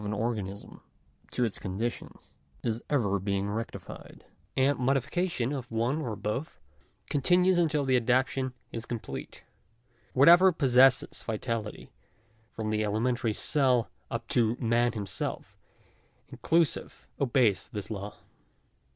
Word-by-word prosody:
an 105 0 -2
organism 105 -3 -4 0.5
to 125 - 0
its 110 - -4
conditions 110 +6 -5 0.3
is 115 0 -1
ever 105 -9 +1
being 100 +1 -1
rectified; 115 +2 -7 0.3
and 135 +2 +3
modi 135 +2 +3
fication 150 -3 -2
of 125 -3 -7
one 120 +7 0
or 120 -7 -3
both, 105 +9 -4 0.5
continues 180 - +3
until 155 -4 +1
the 130 -1 +3
adaptation 130 +1 +1 0.2
is 115 0 -6
com 120 - -3
plete. - - -8 0.7
Whatever 175 +8 +7
possesses 130 -4 +4
vitality, 110 -1 -4 0.6
from 110 -2 -4
the 110 0 +1
elementary 115 +2 0
cell 130 -3 +2 0.2
up 115 0 -4
to 115 -1 +2
man 120 0 +2
himself, 100 -5 -4 0.8
inclusive, 165 -2 0
obeys 125 -6 +2
this 105 -2 -6
law. 100 0 -5
120 Hz, 120 wpm, -29 LUFS, 110-135 Hz, 0.8 s, Whatever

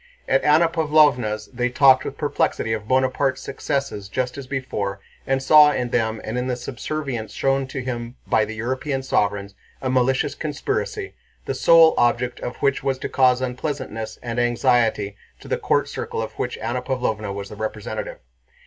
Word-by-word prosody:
At - - +2
Anna 155 +3 +5
Pávlovna's 145 -10 +2
they 125 0 0
talked 130 +1 +5
with 140 - -5
perplexity 145 -6 0
of 110 -1 -4
Bonaparte's 130 +1 +1
successes 135 -7 -3
just 125 +2 -2
as 140 -2 -8
before 105 -8 -3 0.3
and 135 0 +1
saw 150 +1 +7
in 125 -4 -2
them 110 -2 0
and 115 +3 -3
in 125 - -2
the 125 - 0
subservience 125 -1 -5
shown 135 0 0
to 135 -1 -5
him 120 -1 -5
by 110 - +2
the 110 +1 -5
European 130 +4 -2
sovereigns 100 -5 0 0.3
a 130 - -2
malicious 130 0 +2
conspiracy, 395 - -3 0.3
the - - -2
sole 165 -1 +6
object 120 +1 +1
of 125 - -5
which 140 -1 +2
was 135 -1 0
to - - -5
cause 130 -1 +3
unpleasantness 130 -3 -4
and 120 0 -3
anxiety 115 -4 +2 0.2
to - - -13
the - - -1
court - - +1
circle - - -5
of 110 0 -3
which 125 - -2
Anna 120 +3 -2
Pávlovna 110 -6 -2
was 100 0 -6
the - - -9
representative. 110 0 -5
125 Hz, 170 wpm, -22 LUFS, 110-135 Hz, 0.3 s, saw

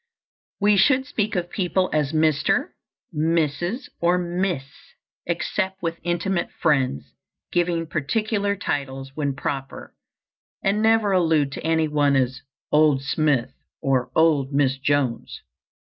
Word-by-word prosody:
We 205 0 +4
should 265 +6 +4
speak 215 -6 -2
of 175 -1 -2
people 185 -1 0
as 150 -2 +1
Mr., 155 -2 +2 0.5
Mrs., 165 - 0
or 175 +1 +3
Miss, 175 -3 -1 0.6
except 190 +2 -2
with 165 0 -2
intimate 175 +1 -1
friends, 135 - 0 0.4
giving 170 -1 0
particular 200 +7 -1
titles 135 -6 -4
when 140 -2 -2
proper, 135 -1 -5 0.7
and 200 +2 +1
never 220 -2 +3
allude 160 -6 +2
to - - -7
any 160 0 +2
one 145 -2 +2
as 130 +1 0 0.3
"Old 150 -3 +4
Smith," 140 -4 0 0.3
or 135 -4 0
"Old 150 -4 +3
Miss 135 -1 +1
Jones." 135 -4 -1
160 Hz, 120 wpm, -23 LUFS, 140-185 Hz, 0.7 s, We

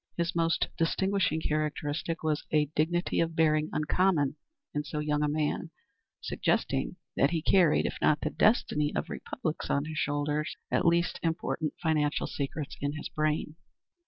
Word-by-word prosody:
His 170 +1 -1
most 165 0 +2
distinguishing 185 -1 +1
characteristic 155 +2 -2
was 155 -1 0
a 150 -1 +4
dignity 175 +3 +1
of 165 -1 0
bearing 155 -1 +3
uncommon 155 -2 +2 0.4
in 150 - -1
so 150 +1 -5
young 150 0 0
a 150 - +2
man, 150 0 -1 0.5
suggesting - - 0 0.2
that 140 - +4
he 165 -2 -1
carried, 175 -5 +4
if - - -2
not 150 -1 +3
the 155 - -1
destiny 150 -9 +2
of - - -2
republics 155 -1 -4
on 140 +1 +1
his 155 +1 -4
shoulders, 145 0 -1 0.2
at - - +2
least, 170 +1 +2
important 165 -2 -1
financial 155 -3 +1
secrets 140 +1 -4
in 145 +1 -1
his 150 - -5
brain. 155 0 -1
155 Hz, 155 wpm, -29 LUFS, 150-165 Hz, 0.5 s, a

